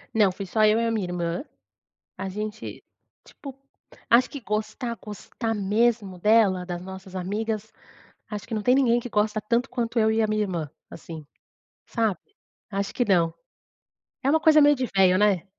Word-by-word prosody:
Não. 210 -4 +4
Fui 195 +2 -6
só 215 +4 +1
eu 215 +2 +4
e 230 - +1
a - - 0
minha 215 -5 -1
irmã. 175 +4 -2 0.7
A 190 +1 -4
gente 215 +2 -6 0.4
tipo, 275 -3 -11 0.5
acho 245 +2 +5
que 285 - -7
gostar, 215 +2 -3
gostar 220 +2 -5
mesmo 210 -1 +1
dela, 205 -3 +3
das 175 -1 -5
nossas 190 0 -10
amigas, 210 +3 -3 0.6
acho 210 -1 -5
que 230 - -5
não 210 - -2
tem 250 +4 +4
ninguém 240 -3 +3
que 245 - -7
gosta 210 +1 +1
tanto 235 +4 0
quanto 235 -2 -2
eu 220 - +4
e 225 0 +2
a - - +3
minha 215 0 +1
irmã, 170 -7 -3 0.2
assim, 160 -2 -10 0.6
sabe? 225 -5 0 0.5
Acho 200 -1 -3
que 245 - 0
não. 170 -4 +2 0.9
É 275 - +2
uma 320 - +4
coisa 310 -1 +6
meio 290 0 +6
de 255 -1 -1
veio 185 -1 +5
né? 200 -5 +3
215 Hz, 175 wpm, -25 LUFS, 190-230 Hz, 0.9 s, coisa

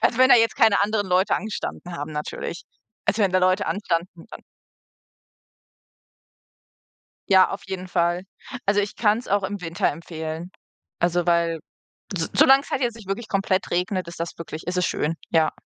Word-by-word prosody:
Also, 235 - +2
wenn 260 +1 +7
da - - +9
jetzt 230 -1 +2
keine 220 -3 +5
anderen 205 -1 0
Leute 185 +2 +3
angestanden 195 -3 -5
haben 145 +2 -5
natürlich. 150 +3 -5 0.4
Also, 210 +1 +2
wenn 190 - +2
da 185 - +4
Leute 185 +2 +2
anstanden, 170 -3 -2
dann - - -9 2.9
Ja, 190 -1 +6
auf 195 - -5
jeden 185 -1 -5
Fall. 175 +1 0 0.4
Also, 205 +1 +3
ich 200 - -4
kann‘s 220 +2 +1
auch 200 0 +2
im 200 0 -4
Winter 165 0 -1
empfehlen. 160 +2 -6 0.5
Also, 175 0 +1
weil 170 -2 +2 0.6
so 160 - 0
solange's 270 +1 +5
halt 265 - -1
jetzt 235 -2 0
nicht 210 -4 -13
wirklich 215 +3 -3
komplett 195 -1 0
regnet, 180 +1 -1
ist 170 - -10
das 170 - -3
wirklich 160 -1 -7
ist 180 - -2
es 180 -1 +2
schön, 155 +3 -1 0.2
ja. 160 -1 +3
185 Hz, 170 wpm, -24 LUFS, 170-205 Hz, 2.9 s, da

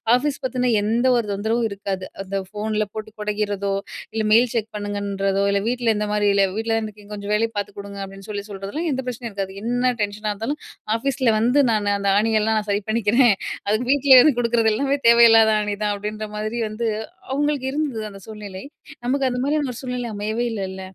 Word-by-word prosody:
Office 285 +2 0
பத்தீன்னா 250 -1 0
எந்த 230 +5 +1
ஒரு 235 -2 +1
தொந்தரவும் 220 +4 0
இருக்காது. 195 -2 -4 0.2
அந்த 195 +1 -3
ஃபோனில 215 +1 -1
போட்டு 220 0 -6
கொடைகிறதோ, 205 -1 -1 0.4
இல்ல 220 -1 -1
மெயில் 240 +2 +5
செக் 225 -2 -1
பண்ணுங்கன்றதோ, 200 -1 -1
இல்ல 200 0 +1
வீட்டில 240 -2 +1
இந்த 210 0 -1
மாரி 210 -1 +2
இல்ல, 200 -1 +5
"வீட்டில 225 0 -1
தான 220 -1 -2
இருக்கிங்க 210 0 -13
கொஞ்சம் 205 0 -3
வேலைய 225 +1 +1
பாத்துக் 205 0 -4
கொடுங்க" 200 0 -8
அப்படின்னு 195 +1 -12
சொல்லி 205 -1 -4
சொல்றதெல்லாம் 200 - -4
எந்த 265 -1 -1
பிரச்சனையும் 240 -2 -5
இருக்காது. 195 -1 -4
என்ன 245 +2 +1
டென்ஷனா 210 +1 -3
இருந்தாலும், 230 +9 -4 0.4
ஆஃபீஸில 260 0 +1
வந்து 245 +6 +3
நான் 205 -2 +1
அந்த 200 0 0
ஆணியெல்லாம் 220 0 +2
நான் 210 -1 -7
சரி 200 0 0
பண்ணிக்கிறேன். 230 +2 +4 0.4
அது 215 +3 +1
வீட்டிலேயே 275 -2 +7 0.2
கொடுக்கறது 230 -2 +2
எல்லாமே 275 +5 0
தேவையில்லாத 225 -2 +7
ஆணி 210 -1 -1
தான், 210 -1 +1
அப்படின்ற 210 +1 -4 0.3
மாரி 215 +2 -3
வந்து. 220 +2 -3 0.4
அவங்களுக்கு 290 -1 0
இருந்தது 280 -6 -2
அந்த 195 - -11
சூழ்நிலை, 205 -3 -8 0.4
நமக்கு 265 +2 +1
அந்த 245 - -3
மாரியான 295 0 +1
ஒரு - - -9
சூழ்நிலை 250 -2 -3
அமையவே 215 +3 -2
இல்லைல்ல. 190 -2 -4
220 Hz, 185 wpm, -22 LUFS, 205-245 Hz, 0.4 s, வீட்டிலேயே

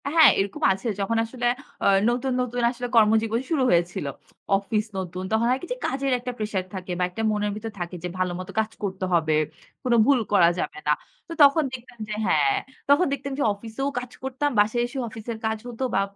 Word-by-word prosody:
আ - - +1
হ্যাঁ, 315 -3 +10
এরকম 195 0 -2
আছে। 195 +5 -6
যখন 200 +3 0
আসলে 245 +2 -5 0.4
আ - - +1 0.2
নতুন, 250 +2 0
নতুন 245 0 -2
আসলে 245 0 -5
কর্মজীবন 225 +1 +4
শুরু 305 -5 +2
হয়েছিল। 175 -3 +1 0.5
অফিস 210 +2 -1
নতুন, 185 0 -4
তখন 220 +1 +2
হয় 255 +1 +2
কী 355 - -7
যে - - -9
কাজের 270 +1 -1
একটা 250 +1 -4
প্রেশার 210 -4 -2
থাকে 185 -1 -6
বা - - +2
একটা 180 +5 -5
মনের 210 -1 0
ভিতর 220 +1 -5
থাকে 175 +1 -4
যে, - - -1
ভালো 185 -1 +1
মতো 185 - -7
কাজ 220 0 0
করতে 190 -1 -2
হবে, 160 -2 +3 0.5
কোনো 245 -2 +2
ভুল 275 -1 +4
করা 170 -4 +6
যাবে - - -3
না। 150 - +5 0.3
তো 335 - -6
তখন 285 +3 +4
দেখতাম 250 -1 -10
যে, - - -2
হ্যাঁ, 140 -6 +3 0.3
তখন 290 +6 +6
দেখতাম 275 0 -4
যে - - +2
অফিসেও 225 +7 -4
কাজ 250 0 -9
করতাম। 265 +2 -1
বাসায় 215 +3 +3
এসেও 260 +2 -4
অফিসের 220 +1 -6
কাজ 220 0 0
হতো 245 +1 -5
বা 195 - +4
225 Hz, 210 wpm, -25 LUFS, 195-255 Hz, 0.5 s, হ্যাঁ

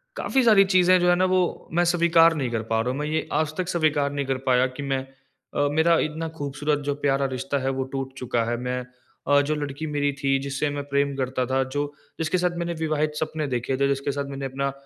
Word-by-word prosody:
काफ़ी 265 -1 +1
सारी 210 -4 +6
चीज़ें 185 0 +6
जो 180 - +3
है 175 - +5
ना 185 +1 +2
वो 185 -1 0
मैं 175 +1 +3
स्वीकार 170 -1 +4
नहीं 135 -5 -1
कर 115 -2 -1
पा 110 - +2
रहा 125 +2 -1
हूँ। 135 - -4
मैं 150 - -2
ये 155 +1 -1
आज 155 -1 -3
तक 185 -2 -2
स्वीकार 155 -5 +1
नहीं 140 -1 -2
कर 135 -1 0
पाया 125 +1 +4
कि 145 - -4
मैं 135 -1 -1 0.5
अ, 145 0 +2
मेरा 160 +2 +4
इतना 160 +2 -2
ख़ूबसूरत 145 +1 -1
जो 145 - 0
प्यारा 140 -1 +1
रिश्ता 135 +2 -2
है 130 - -1
वो - - +1
टूट 135 -1 -4
चुका 120 -2 -1
है। 120 - -1
मैं 125 +1 -3 0.4
अ, 145 +1 +5
जो 155 - +1
लड़की 145 0 -4
मेरी 145 -1 0
थी 135 0 +3
जिससे 140 +2 -2
मैं 145 - -3
प्रेम 140 0 +1
करता 130 -1 -1
था, 130 +1 +1
जो 145 +2 -3 0.3
जिसके 160 +3 0
साथ 180 0 +1
मैंने 170 0 -2
विवाहित 155 -1 -1
सपने 155 -1 -2
देखे 125 0 -1
थे, 140 +1 +2
जिसके 140 0 -1
साथ 140 0 -3
मैंने 135 0 -5
अपना 140 +1 -2
145 Hz, 240 wpm, -24 LUFS, 135-160 Hz, 0.5 s, सारी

